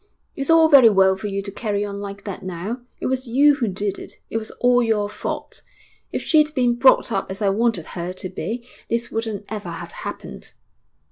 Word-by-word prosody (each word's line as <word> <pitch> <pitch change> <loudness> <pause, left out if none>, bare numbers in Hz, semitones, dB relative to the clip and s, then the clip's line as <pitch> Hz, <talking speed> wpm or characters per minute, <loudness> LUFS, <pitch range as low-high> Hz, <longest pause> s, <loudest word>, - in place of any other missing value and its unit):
'It's 275 +1 -4
all 325 -1 +7
very 275 -7 +8
well 190 -2 +4
for 195 +2 -5
you 200 0 -3
to 200 - -7
carry 205 -1 -2
on 200 0 -5
like 200 0 -7
that 200 -3 -6
now. 190 +6 -5 0.2
It - - -5
was 260 0 -1
you 280 +5 +5
who 265 -5 -1
did 200 0 -2
it; - - -9 0.2
it - - -1
was 220 -1 -5
all 245 0 +4
your 220 -3 +1
fault. 210 - -6 0.5
If - - -3
she'd 305 -1 +3
been 245 -3 +3
brought 245 0 +4
up 195 -3 -1
as 190 +1 -5
I 205 -2 +2
wanted 215 -4 +1
her 175 0 -4
to 185 0 -6
be, 235 +6 -5 0.2
this 235 +1 -2
wouldn't 220 -3 -3
ever 210 -5 -5
have 165 - -7
happened.' - - -8
215 Hz, 210 wpm, -22 LUFS, 195-245 Hz, 0.5 s, very